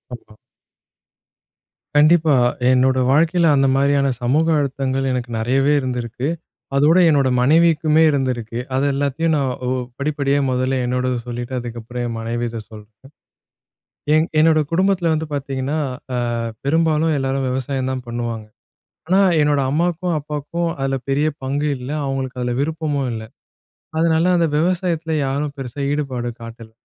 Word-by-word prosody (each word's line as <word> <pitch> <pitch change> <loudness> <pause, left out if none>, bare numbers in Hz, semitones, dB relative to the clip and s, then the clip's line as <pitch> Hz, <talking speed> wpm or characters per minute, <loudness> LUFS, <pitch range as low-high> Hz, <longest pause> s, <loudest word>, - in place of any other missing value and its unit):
ஆமா. 110 -2 -17 1.6
கண்டிப்பா. 155 0 +5 0.4
என்னோட 130 +1 +3
வாழ்க்கையில 165 +4 +3
அந்த 135 0 +3
மாதிரியான 140 0 +2
சமூக 145 +7 +2
அழுத்தங்கள் 135 -1 -1
எனக்கு 125 -1 -3
நிறையவே 135 +5 +2
இருந்திருக்கு. 125 0 -3 0.5
அதோட 150 +5 +4
என்னோட 140 -3 +3
மனைவிக்குமே 160 +2 +4
இருந்திருக்கு. 125 -4 -2 0.2
அது 135 +2 +1
எல்லாத்தையும் 145 +4 0
நான் 135 -3 0 0.2
ஒ - - 0 0.3
படிப்படியா 140 -1 0
முதல்ல 130 +1 0
என்னோடது 125 0 -1
சொல்லிட்டு, 120 +1 -5
அதுக்கப்புறம் 120 +1 -6
என் 115 -1 -4
மனைவியித 115 0 -3
சொல்றேன். 110 +4 -15 1.0
என் 155 +1 +3
என்னோட 160 0 +4
குடும்பத்தில 185 -1 +1
வந்து 160 +1 -2
பார்த்தீங்கன்னா, 135 +1 -3 0.4
அ - - 0 0.5
பெரும்பாலும் 160 +1 +2
எல்லாரும் 135 0 -1
விவசாயம் 130 0 -2
தான் 130 -1 -5
பண்ணுவாங்க. 115 -2 -4 0.6
ஆனா, 190 +2 +4 0.2
என்னோட 145 -1 +2
அம்மாவுக்கும், 175 +3 0
அப்பாவுக்கும் 150 +4 -3
அதில 135 0 0
பெரிய 145 +3 +2 0.2
பங்கு 145 +3 -1
இல்ல. 125 +2 -7 0.2
அவங்களுக்கு 135 -1 -3
அதுல 120 0 -1
விருப்பமும் 150 -3 -1
இல்ல. 110 -1 -5 0.8
அதனால 165 0 +2
அந்த 170 -1 +3
விவசாயத்துல 170 -1 0
யாரும் 140 +2 -2
பெருசா 135 +1 -6
ஈடுபாடு 130 -5 -2
காட்டல. 115 -1 -10
135 Hz, 125 wpm, -20 LUFS, 125-155 Hz, 1.6 s, கண்டிப்பா